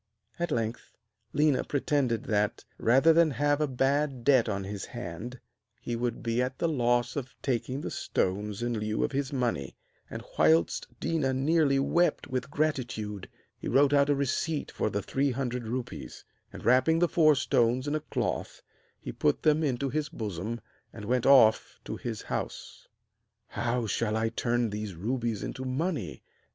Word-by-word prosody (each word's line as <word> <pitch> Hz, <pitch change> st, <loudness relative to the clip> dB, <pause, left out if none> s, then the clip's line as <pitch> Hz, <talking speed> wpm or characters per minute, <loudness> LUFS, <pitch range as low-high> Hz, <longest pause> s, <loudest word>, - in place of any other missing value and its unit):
At 175 Hz, 0 st, -1 dB
length 115 Hz, -4 st, -3 dB, 0.4 s
Léna 150 Hz, -2 st, +2 dB
pretended 140 Hz, -4 st, 0 dB
that, 105 Hz, -1 st, 0 dB
rather 135 Hz, +8 st, +5 dB
than 165 Hz, 0 st, +5 dB
have 145 Hz, +2 st, +1 dB
a 150 Hz, -, +2 dB
bad 135 Hz, 0 st, 0 dB
debt 130 Hz, -4 st, +4 dB
on 100 Hz, -1 st, -2 dB
his 100 Hz, 0 st, -5 dB
hand, 120 Hz, +3 st, -7 dB, 0.4 s
he 120 Hz, -, -4 dB
would 120 Hz, 0 st, -2 dB
be 115 Hz, +1 st, 0 dB
at 130 Hz, +1 st, -2 dB
the 170 Hz, -, 0 dB
loss 120 Hz, -5 st, +1 dB
of 130 Hz, -3 st, -5 dB
taking 130 Hz, +1 st, -1 dB
the -, -, -5 dB
stones 105 Hz, +3 st, -2 dB
in 120 Hz, -2 st, -1 dB
lieu 105 Hz, 0 st, -1 dB
of -, -, 0 dB
his 140 Hz, 0 st, -2 dB
money; 120 Hz, -, -2 dB, 0.3 s
and, -, -, -6 dB, 0.2 s
whilst 80 Hz, +1 st, +3 dB
Déna 140 Hz, -5 st, 0 dB
nearly 145 Hz, 0 st, +3 dB
wept 170 Hz, +6 st, +2 dB
with 130 Hz, -1 st, -3 dB
gratitude, 120 Hz, -10 st, -2 dB, 0.3 s
he -, -, -7 dB
wrote 140 Hz, +1 st, +4 dB
out 140 Hz, 0 st, +4 dB
a 145 Hz, -, +4 dB
receipt 140 Hz, +3 st, -1 dB
for -, -, -1 dB
the 100 Hz, -1 st, -2 dB
three 140 Hz, +6 st, 0 dB
hundred 125 Hz, -2 st, -3 dB
rupees; 120 Hz, -, -6 dB, 0.3 s
and, -, -, -10 dB
wrapping 130 Hz, +7 st, +4 dB
the 175 Hz, +1 st, +3 dB
four 155 Hz, -3 st, +4 dB
stones 130 Hz, -1 st, +1 dB
in 145 Hz, -, -1 dB
a 155 Hz, -, +1 dB
cloth, -, -, -3 dB, 0.4 s
he -, -, -6 dB
put 75 Hz, -, 0 dB
them 155 Hz, +1 st, +3 dB
into 135 Hz, -1 st, 0 dB
his 150 Hz, +2 st, -1 dB
bosom, 110 Hz, -, -4 dB, 0.3 s
and 105 Hz, -, -9 dB
went 125 Hz, +2 st, +1 dB
off 130 Hz, -6 st, +5 dB
to -, -, -4 dB
his 115 Hz, -3 st, -5 dB
house. -, -, -5 dB, 0.6 s
'How 120 Hz, 0 st, -1 dB
shall 110 Hz, 0 st, 0 dB
I 115 Hz, 0 st, +1 dB
turn 120 Hz, 0 st, 0 dB
these 105 Hz, -2 st, -5 dB
rubies 115 Hz, +3 st, -2 dB
into 130 Hz, -, -5 dB
money?' 130 Hz, -, -3 dB
125 Hz, 165 wpm, -29 LUFS, 110-140 Hz, 0.6 s, rather